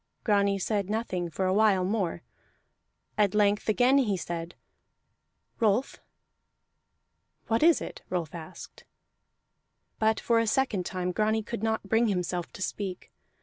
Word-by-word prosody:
Grani 200 -2 +2
said 200 0 -1
nothing 195 -6 -2
for 190 +3 -2
a 185 - +2
while 200 -3 +3
more; 185 -4 -1 1.0
at 205 -1 +3
length 210 0 +2
again 250 +5 +4
he 210 -8 +1
said, 170 0 -5 1.0
"Rolf." 225 +4 +1 1.5
"What 225 0 0
is 330 +1 +5
it?" - - -7
Rolf 170 -4 -3
asked. 165 -2 -10 1.2
But 220 0 +2
for 230 -1 +2
a 230 - +1
second 220 -7 0
time 180 -1 -2
Grani 215 +3 +1
could 230 0 -5
not 220 0 0
bring 225 +3 +3
himself 180 -3 -2
to 185 - -5
speak. 190 -3 -5
205 Hz, 135 wpm, -28 LUFS, 180-225 Hz, 1.5 s, is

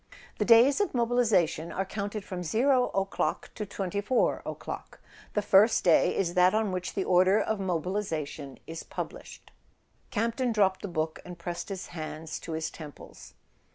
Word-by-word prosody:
"The 210 - +2
days 240 - +6
of 405 - -1
mobilisation 220 -10 +2
are 190 - -2
counted 205 +1 -4
from 185 -2 -5
0 250 - +3
o'clock 195 0 -1
to 210 - -5
24 200 +6 0
o'clock. - - -7 0.4
The 210 - +1
first 210 +4 +5
day 170 -3 +4
is 175 -3 0
that 180 +2 +4
on 215 -2 +1
which 185 0 -4
the 195 - 0
order 185 +3 +4
of 220 -1 -1
mobilisation 165 -6 -3
is 165 0 -6
published." - - -8 0.6
Campton 235 +3 0
dropped 195 -3 +2
the - - -4
book 160 -3 -2
and 180 -1 -9
pressed 175 +4 -5
his 195 -2 -6
hands 155 -1 -6
to 165 - -7
his 160 0 -3
temples. 150 -3 -11
190 Hz, 155 wpm, -28 LUFS, 170-220 Hz, 0.6 s, days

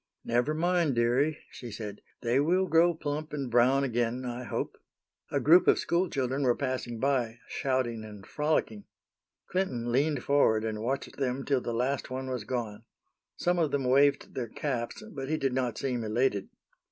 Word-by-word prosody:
"Never 120 +6 +1
mind, 170 -3 +2
dearie," 125 +6 +2
she 120 - -8
said, 105 -2 -7 0.2
"they 120 +2 +2
will 180 +6 +3
grow 170 0 +4
plump 150 0 -4
and 135 -4 -3
brown 125 +4 +4
again, 120 0 -1
I 125 0 -4
hope." - - -3 0.5
A - - 0
group 170 +4 +6
of - - +6
school 175 +1 +1
children 135 +1 -1
were 125 -3 +3
passing 130 -4 -3
by, 125 -4 0
shouting 130 -4 -1
and 105 -2 -10
frolicking. 150 -9 -1 0.6
Clinton 130 -11 -1
leaned 140 +2 +1
forward 110 -6 +3
and 110 -1 -3
watched 130 +4 -3
them 135 0 -1
till 135 -3 +1
the 120 - -3
last 125 +4 -1
one 130 0 -4
was 125 -5 -3
gone. 115 -3 -4 0.5
Some 175 0 +1
of 160 -3 +2
them 140 -1 -1
waved 140 +3 +3
their 120 -3 -4
caps, 125 - -3
but 135 -1 -5
he 155 - +1
did 135 -3 0
not 125 -2 -1
seem 125 -4 -2
elated. 110 -2 0
130 Hz, 175 wpm, -29 LUFS, 120-145 Hz, 0.6 s, group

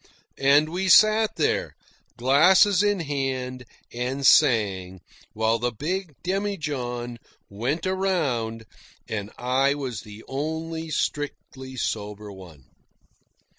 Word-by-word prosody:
And 145 +3 +4
we 185 +3 -2
sat 215 +3 +5
there, - - 0 0.4
glasses 180 +10 +5
in 205 -3 +1
hand, 130 -4 -3 0.3
and 125 +3 -3
sang, 95 -8 +3 0.3
while 110 +1 +1
the 120 +1 -1
big 165 - -4
demijohn 145 -11 -3 0.3
went 130 - -2
around; 145 -13 -1 0.4
and 105 -2 -4
I 130 +3 +1
was 130 -7 -5
the 105 0 -12
only 160 +3 -4
strictly 135 -3 -4
sober 105 -3 -4
one. 90 -8 -13
135 Hz, 100 wpm, -25 LUFS, 115-165 Hz, 0.4 s, sat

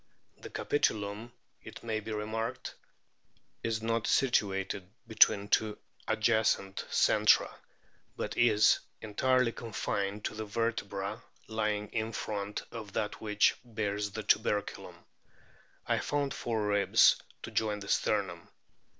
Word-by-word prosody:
The - - -9
capitulum, 110 -4 -1 0.3
it - - -11
may 110 -2 -1
be 110 +1 -7
remarked, 110 +1 -3 0.9
is 110 -1 -2
not 115 0 0
situated 95 -7 +1 0.2
between 100 -2 +5
two 105 0 +1 0.3
adjacent 110 -3 +1
centra, - - +4 0.6
but - - -3
is 110 -3 +5 0.2
entirely 125 +3 +2
confined 105 -3 -3
to - - -2
the 110 - -5
vertebra 110 -1 -2 0.2
lying 105 -1 -1
in 110 0 -2
front 105 -1 -4
of 110 -4 -8
that 105 -1 -2
which 105 -1 +3
bears 105 -3 -2
the 110 +2 -6
tuberculum. 105 0 0 0.9
I - - +1
found 145 -1 -1
four 110 -3 -2
ribs 105 -1 +4 0.2
to - - -6
join 105 -2 0
the 100 - -8
sternum. 95 -5 0
105 Hz, 115 wpm, -31 LUFS, 100-115 Hz, 0.9 s, between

